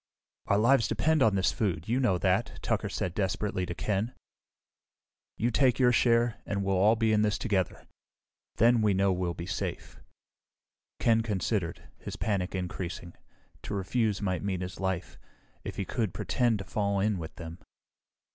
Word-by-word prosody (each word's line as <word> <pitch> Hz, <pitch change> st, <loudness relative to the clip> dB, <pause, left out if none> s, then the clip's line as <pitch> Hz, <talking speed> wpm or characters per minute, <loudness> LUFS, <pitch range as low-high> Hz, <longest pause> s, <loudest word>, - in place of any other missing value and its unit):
"Our 100 Hz, -, +3 dB
lives 115 Hz, +2 st, +4 dB
depend 160 Hz, -1 st, +1 dB
on 110 Hz, -5 st, +4 dB
this 95 Hz, -1 st, +2 dB
food, 90 Hz, -6 st, -2 dB
you 120 Hz, +3 st, +1 dB
know 105 Hz, -9 st, +2 dB
that," -, -, 0 dB
Tucker -, -, 0 dB
said 90 Hz, -, -3 dB
desperately 95 Hz, -1 st, -1 dB
to 85 Hz, -, -4 dB
Ken. 105 Hz, +7 st, -1 dB, 1.2 s
"You 120 Hz, +2 st, +1 dB
take 125 Hz, 0 st, +3 dB
your 125 Hz, -2 st, +5 dB
share, 120 Hz, -1 st, +2 dB
and 100 Hz, 0 st, -2 dB
we'll 95 Hz, 0 st, +1 dB
all 105 Hz, +5 st, +5 dB
be 110 Hz, -1 st, +2 dB
in 105 Hz, -, +3 dB
this 105 Hz, -1 st, +1 dB
together. 95 Hz, -6 st, -1 dB, 0.7 s
Then 115 Hz, +1 st, +4 dB
we 105 Hz, -3 st, +3 dB
know 95 Hz, 0 st, +3 dB
we'll 90 Hz, -1 st, -2 dB
be 85 Hz, -, -6 dB
safe." 90 Hz, -, -5 dB, 1.0 s
Ken 115 Hz, -1 st, +3 dB
considered, 95 Hz, -6 st, -2 dB
his -, -, -7 dB
panic 100 Hz, -3 st, -1 dB
increasing. 90 Hz, -1 st, -5 dB, 0.5 s
To 100 Hz, -, -5 dB
refuse 105 Hz, +1 st, 0 dB
might 95 Hz, -3 st, -1 dB
mean 95 Hz, -2 st, -2 dB
his 90 Hz, 0 st, -6 dB
life. 95 Hz, -2 st, -3 dB, 0.4 s
If -, -, -6 dB
he 100 Hz, -, -3 dB
could 105 Hz, -5 st, -2 dB
pretend 120 Hz, +1 st, +1 dB
to 95 Hz, -, -7 dB
fall 100 Hz, 0 st, -1 dB
in 100 Hz, -1 st, +1 dB
with 80 Hz, -1 st, -7 dB
them.... 80 Hz, 0 st, -8 dB
100 Hz, 165 wpm, -29 LUFS, 90-115 Hz, 1.2 s, your